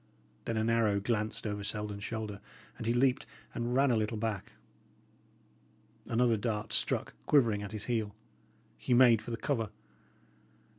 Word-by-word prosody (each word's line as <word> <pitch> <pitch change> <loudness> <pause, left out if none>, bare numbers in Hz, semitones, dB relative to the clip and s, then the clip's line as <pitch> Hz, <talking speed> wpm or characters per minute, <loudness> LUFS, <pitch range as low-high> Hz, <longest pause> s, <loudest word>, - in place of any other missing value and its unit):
Then 115 - -1
an 110 +1 +1
arrow 110 -3 +3
glanced 110 +1 -2
over 105 -1 -3
Selden's 105 -1 -4
shoulder; 110 -3 -4 0.3
and 115 - -6
he 115 - +3
leaped 130 +2 +2 0.3
and 120 +1 -2
ran 135 0 +4
a - - +3
little 110 0 0
back. 105 -3 -3 1.5
Another 115 -1 +3
dart 105 0 -2
struck - - 0
quivering 115 -8 +4
at 100 0 -6
his 110 -1 -4
heel. 110 -4 -1 0.6
He 125 - +2
made 120 -3 +6
for - - -9
the 115 - -2
cover. 115 -5 -1
110 Hz, 150 wpm, -32 LUFS, 105-120 Hz, 1.5 s, made